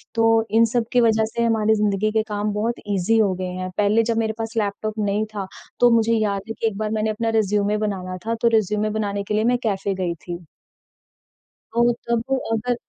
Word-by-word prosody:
तो 225 0 +3
इन 225 +1 +5
सब 240 -2 +1
की 245 - +5
वजह 220 -1 +3
से 235 +1 -2
हमारी 220 -1 +2
ज़िंदगी 210 0 +1
के 220 0 +1
काम 210 0 -1
बहुत 225 +3 -1 0.2
इज़ी 195 +5 +2
हो 200 -3 +3
गए 185 0 -4
हैं। 185 0 -3
पहले 210 +2 +3
जब 225 - -1
मेरे 220 -1 0
पास 225 0 -4
लैपटॉप 215 0 -1
नहीं 205 +1 0
था, 195 -2 -3 0.3
तो 245 - +6
मुझे 230 0 +3
याद 210 -3 0
है - - -2
कि 225 - +1
एक 210 -3 -3
बार 215 0 -2
मैंने 220 0 0
अपना 225 +1 -1
रिज़्यूमे 205 0 +1
बनाना 190 -4 -3
था, 230 - +1
तो 235 +1 +1
रिज़्यूमे 210 0 0
बनाने 200 -1 -2
के 205 - -4
लिए 215 +1 +2
मैं 245 +2 +3
कैफ़े 200 -2 -1
गई 175 -1 -1
थी। 175 +2 -8 1.3
तो 235 +1 +4 0.2
तब 235 -1 +1 0.3
अगर 240 +2 0
215 Hz, 215 wpm, -22 LUFS, 205-225 Hz, 1.3 s, तो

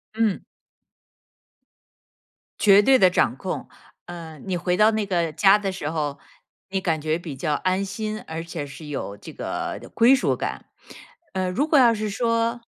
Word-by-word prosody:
嗯。 220 -3 0 2.2
绝 200 -1 +7
对 265 +5 +5
的 185 - +6
掌 125 -9 +1
控， 185 +7 -5 0.4
嗯， 165 -3 -9
你 185 -2 -1
回 180 +1 0
到 215 +2 +5
那 215 -1 -1
个 170 -4 0
家 195 +6 +5
的 200 -2 -3
时 155 -5 -4
候， 150 -3 -3 0.5
你 190 0 -1
感 165 -4 0
觉 155 +1 0
比 170 -5 -7
较 150 +2 -1
安 185 +5 0
心， 215 +2 -4
而 160 +1 -5
且 165 -3 -5
是 145 +3 -11
有 135 -8 -5
这 - - -11
个 - - -4
归 235 +3 +6
属 270 - +1
感， - - -5 0.7
呃， 185 -1 -1
如 270 +12 0
果 305 -3 +5
要 240 -3 +6
是 215 -1 -3
说 230 +2 0
185 Hz, 180 characters per minute, -23 LUFS, 160-215 Hz, 2.2 s, 绝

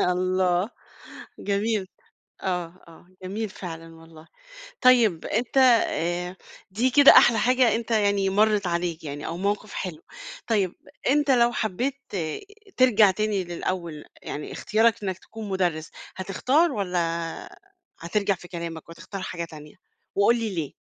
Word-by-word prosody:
الله، 185 +2 +1 0.7
جميل، 205 -1 -1 0.5
آه 180 -1 -3
آه، 165 +1 -17 0.2
جميل 205 +4 -4
فعلًا 165 -3 -9
والله. 165 -1 -15 0.5
طيب، 230 -10 +4
أنت 235 +4 -2
آآ 180 -8 +2 0.3
دي 235 +7 +1
كده 285 +2 +8
أحلى 235 -2 +6
حاجة 250 0 +3
أنت 230 0 -6
يعني 200 -3 +2
مرِّت 210 0 +2
عليك 170 -1 -2
يعني، 145 0 -6
أو 165 - -4
موقف 205 +2 -2
حلو. 170 -4 -5 0.4
طيب، 200 -6 +1 0.4
أنت 290 0 +2
لو 240 -2 +4
حبّيت 240 +5 -1 0.2
ت - - -4 0.6
ترجع 225 -6 +5
تاني 205 0 -1
للأول 170 -2 -4 0.2
يعني، 150 - -6
اختيارَك 220 0 +1
إنَّك 190 -2 -3
تكون 220 -2 -9
مُدرِّس، 175 -5 -1 0.3
هتختار، 260 - +1
والّا 185 -6 -2 1.0
هترجع 200 +4 0
في 180 0 -13
كلامَك 170 -2 -7
وتختار 185 +3 -8
حاجة 170 -2 -4
تانية؟ 150 -2 -12 0.4
وقُل 200 +4 +4
لي 220 -4 -3
ليه؟ 160 -5 -3
190 Hz, 130 wpm, -25 LUFS, 175-220 Hz, 1.0 s, كده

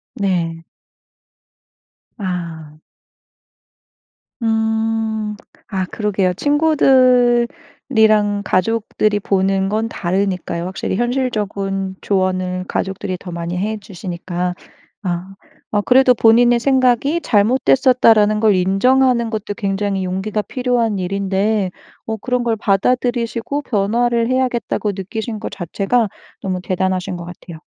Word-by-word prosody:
네. 170 -4 -1 1.5
아. 170 -6 -5 1.7
음. 220 -1 0 0.3
아 190 -3 -2
그러게요. 195 -2 -1
친구들이랑 250 - +2
가족들이 210 +2 0
보는 195 -1 +1
건 220 +2 0
다르니까요. 185 -3 -2
확실히 190 +1 -3
현실적인 205 -6 -2
조언은 185 -1 -1
가족들이 190 -1 -3
더 180 -2 -8
많이 170 +1 -4
해 215 +4 -2
주시니까. 180 -2 -4 0.5
아. 185 +1 -4 0.4
아 205 -1 +2
그래도 255 +1 +5
본인의 240 +1 +4
생각이 265 +4 +2
'잘못됐었다.'라는 225 -2 +4
걸 215 -3 +4
인정하는 235 +6 +3
것도 215 -2 -4
굉장히 195 -2 -1
용기가 195 +3 -2
필요한 240 -4 -1
일인데 195 +2 0 0.4
어 220 - -2
그런 250 +3 -1
걸 230 -1 +1
받아들이시고 235 +5 0
변화를 235 +2 +1
해야겠다고 245 -5 0
느끼신 215 +3 -5
것 - - -5
자체가 200 +6 0 0.3
너무 185 -1 -3
대단하신 185 -1 -1
것 170 - -7
같아요. 175 -1 -10
210 Hz, 255 characters per minute, -18 LUFS, 190-235 Hz, 1.7 s, 그래도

